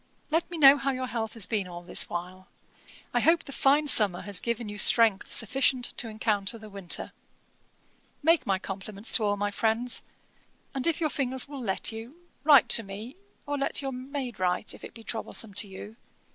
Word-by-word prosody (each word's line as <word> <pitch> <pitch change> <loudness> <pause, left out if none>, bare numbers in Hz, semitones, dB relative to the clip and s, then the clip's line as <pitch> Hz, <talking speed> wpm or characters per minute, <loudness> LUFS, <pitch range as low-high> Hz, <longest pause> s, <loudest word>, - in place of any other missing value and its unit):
'Let 325 +2 0
me 345 - -6
know 280 -2 +8
how 275 0 -2
your 255 -1 -2
health 230 -3 -4
has 220 -5 -1
been 200 -2 -2
all 175 -1 -9
this 175 - -1
while. 180 +2 -7 0.7
I - - +2
hope 330 +1 +3
the - - -10
fine 280 +3 +3
summer 205 -9 +5
has 200 -1 -3
given 235 -1 -3
you 205 0 -6
strength 220 -2 +5
sufficient 250 +2 +1
to 235 - -2
encounter 215 -1 -2
the 215 -1 -13
winter. 195 -3 -4 1.1
'Make 330 +2 +3
my 195 -1 +2
compliments 195 +3 -1
to 225 - +2
all 205 -1 0
my 205 0 -2
friends; 230 +3 0 0.7
and, 270 +3 -1
if 330 - +1
your 310 -2 0
fingers 260 -1 -1
will 280 -2 -8
let 195 -2 0
you, 225 +6 -9 0.3
write 285 -4 +6
to - - +5
me, 215 +6 -9 0.3
or 290 0 -3
let 275 - 0
your 270 - -3
maid 255 -3 -6
write, 180 +2 0
if - - -14
it - - -10
be 225 - -11
troublesome 225 -1 -3
to 205 +2 0
you. 200 +3 -10
225 Hz, 195 wpm, -27 LUFS, 200-270 Hz, 1.1 s, know